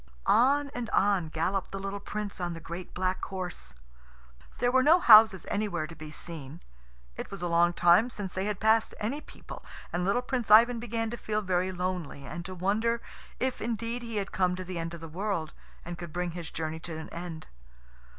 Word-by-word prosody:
On 280 Hz, +4 st, +4 dB
and 240 Hz, -3 st, -4 dB
on 195 Hz, -5 st, +2 dB
galloped 180 Hz, +5 st, -1 dB
the 195 Hz, -, -4 dB
little 195 Hz, +1 st, -4 dB
Prince 205 Hz, -1 st, -5 dB
on 175 Hz, -1 st, -2 dB
the -, -, -7 dB
great 170 Hz, +2 st, -7 dB
black 185 Hz, +1 st, -1 dB
horse. 180 Hz, -, -6 dB, 0.8 s
There 245 Hz, 0 st, +2 dB
were 260 Hz, +1 st, +5 dB
no 310 Hz, +6 st, +6 dB
houses 220 Hz, -, +8 dB
anywhere 200 Hz, -6 st, -1 dB
to 165 Hz, -, -10 dB
be 155 Hz, -1 st, -9 dB
seen. 150 Hz, -1 st, -7 dB, 0.6 s
It -, -, -5 dB
was 195 Hz, -3 st, -7 dB
a -, -, 0 dB
long 170 Hz, 0 st, +4 dB
time 175 Hz, +8 st, +5 dB
since 205 Hz, -6 st, -6 dB
they 190 Hz, +1 st, -2 dB
had 210 Hz, -2 st, -2 dB
passed 220 Hz, +1 st, +3 dB
any 255 Hz, +8 st, -2 dB
people, -, -, -11 dB, 0.3 s
and 175 Hz, +1 st, 0 dB
little 200 Hz, +7 st, +1 dB
Prince 250 Hz, -3 st, -2 dB
Ivan 230 Hz, +3 st, +7 dB
began 225 Hz, -1 st, -2 dB
to 240 Hz, -, -4 dB
feel 215 Hz, -1 st, -2 dB
very 185 Hz, 0 st, 0 dB
lonely, 180 Hz, -6 st, -4 dB
and 170 Hz, +4 st, -6 dB
to 185 Hz, 0 st, -6 dB
wonder 215 Hz, +6 st, +1 dB, 0.4 s
if 260 Hz, 0 st, -1 dB
indeed 230 Hz, +2 st, -2 dB
he 230 Hz, -2 st, -6 dB
had 200 Hz, -1 st, -2 dB
come 180 Hz, -1 st, +1 dB
to 185 Hz, -, -5 dB
the 180 Hz, -1 st, -5 dB
end 165 Hz, +1 st, -4 dB
of 165 Hz, -, -11 dB
the 165 Hz, -, -7 dB
world, 175 Hz, -1 st, -3 dB, 0.3 s
and 175 Hz, -1 st, -6 dB
could 170 Hz, -1 st, -7 dB
bring 175 Hz, +1 st, -2 dB
his 170 Hz, -2 st, -6 dB
journey 160 Hz, 0 st, -4 dB
to 160 Hz, -1 st, -6 dB
an 160 Hz, -, -7 dB
end. 170 Hz, -2 st, -7 dB
190 Hz, 205 wpm, -29 LUFS, 170-220 Hz, 0.8 s, houses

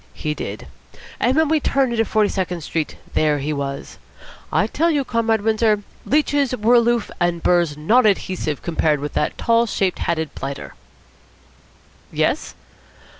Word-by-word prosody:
He 150 Hz, -, -2 dB
did. -, -, -6 dB, 0.5 s
And 255 Hz, -, +2 dB
when 320 Hz, 0 st, +4 dB
we 315 Hz, +1 st, +2 dB
turned 270 Hz, -3 st, +1 dB
into 225 Hz, -1 st, +1 dB
Forty 215 Hz, -1 st, +2 dB
second 180 Hz, -3 st, -2 dB
Street, 155 Hz, 0 st, -3 dB, 0.2 s
there 150 Hz, -1 st, +2 dB
he 145 Hz, +2 st, -2 dB
was. 140 Hz, -1 st, -5 dB, 0.5 s
I -, -, +2 dB
tell 335 Hz, +2 st, +1 dB
you, 290 Hz, -4 st, +1 dB
Comrade 230 Hz, -2 st, +1 dB
Windsor, 220 Hz, -1 st, +2 dB, 0.2 s
leeches 285 Hz, -2 st, +2 dB
were 220 Hz, +3 st, +3 dB
aloof, 235 Hz, -1 st, +3 dB
and 175 Hz, -1 st, 0 dB
burrs 170 Hz, -4 st, +2 dB
non 220 Hz, +11 st, +4 dB
adhesive 185 Hz, -7 st, -1 dB
compared 160 Hz, -3 st, +1 dB
with 145 Hz, +1 st, -5 dB
that 150 Hz, -, -1 dB
tall 230 Hz, 0 st, +2 dB
shaped 190 Hz, -3 st, -1 dB
hatted 160 Hz, -2 st, -2 dB
blighter." 140 Hz, 0 st, -6 dB, 1.4 s
"Yes?" -, -, -1 dB
205 Hz, 150 wpm, -21 LUFS, 155-235 Hz, 1.4 s, when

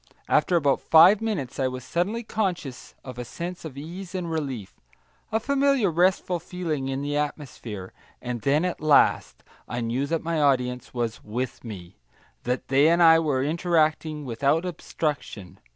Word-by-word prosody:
After 180 Hz, -, +2 dB
about 145 Hz, -5 st, +2 dB
five 175 Hz, +6 st, +7 dB
minutes 175 Hz, -, -3 dB
I 130 Hz, -, +2 dB
was 130 Hz, -1 st, -5 dB
suddenly 200 Hz, -, -1 dB
conscious 185 Hz, -, -3 dB
of 125 Hz, -2 st, -8 dB
a -, -, -3 dB
sense 170 Hz, +8 st, -6 dB
of 150 Hz, -5 st, -8 dB
ease 175 Hz, +5 st, -8 dB
and 175 Hz, -3 st, -3 dB
relief, 135 Hz, -11 st, -4 dB, 0.6 s
a 220 Hz, -, +2 dB
familiar 275 Hz, -4 st, +2 dB
restful 180 Hz, +1 st, +1 dB
feeling 165 Hz, -6 st, -4 dB
in 135 Hz, +1 st, -3 dB
the 145 Hz, 0 st, -2 dB
atmosphere; 130 Hz, -10 st, -5 dB, 0.3 s
and 120 Hz, -2 st, -5 dB
then, 145 Hz, -, +2 dB
at 180 Hz, -, -3 dB
last, 155 Hz, -2 st, +3 dB, 0.2 s
I 120 Hz, -, -4 dB
knew 120 Hz, +4 st, -1 dB
that 165 Hz, +1 st, -1 dB
my 165 Hz, -1 st, -1 dB
audience 125 Hz, -3 st, +1 dB
was 120 Hz, -2 st, -3 dB
"with 120 Hz, +4 st, -4 dB
me," 95 Hz, -6 st, -9 dB, 0.5 s
that 125 Hz, +1 st, -2 dB
they 140 Hz, +3 st, +4 dB
and 170 Hz, +1 st, +4 dB
I 165 Hz, 0 st, +7 dB
were 145 Hz, -5 st, 0 dB
interacting 155 Hz, -1 st, 0 dB
without 140 Hz, +8 st, +1 dB
obstruction. 150 Hz, -, -4 dB
150 Hz, 160 wpm, -25 LUFS, 130-175 Hz, 0.6 s, five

